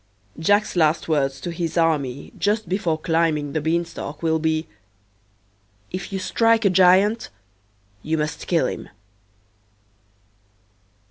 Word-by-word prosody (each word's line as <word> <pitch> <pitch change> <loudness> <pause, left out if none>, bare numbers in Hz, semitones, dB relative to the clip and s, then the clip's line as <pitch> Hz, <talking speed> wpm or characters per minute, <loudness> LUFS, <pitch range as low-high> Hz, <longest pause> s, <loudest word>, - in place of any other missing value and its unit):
Jack's 205 +6 +2
last 155 -2 +2
words 140 -4 0
to 175 - -4
his 170 0 -3
army 145 -5 0
just 210 0 0
before 175 -3 0
climbing 160 -3 0
the 155 - -1
beanstalk 160 -1 -3
will 160 -1 +2
be, 160 0 0 1.3
"If 185 +1 -5
you 195 - -2
strike 225 +4 +2
a 200 - +5
giant 190 +4 +4 0.7
you 160 +5 -1
must 150 0 -3
kill 170 -2 +2
him." - - -5
165 Hz, 120 wpm, -22 LUFS, 155-185 Hz, 1.3 s, a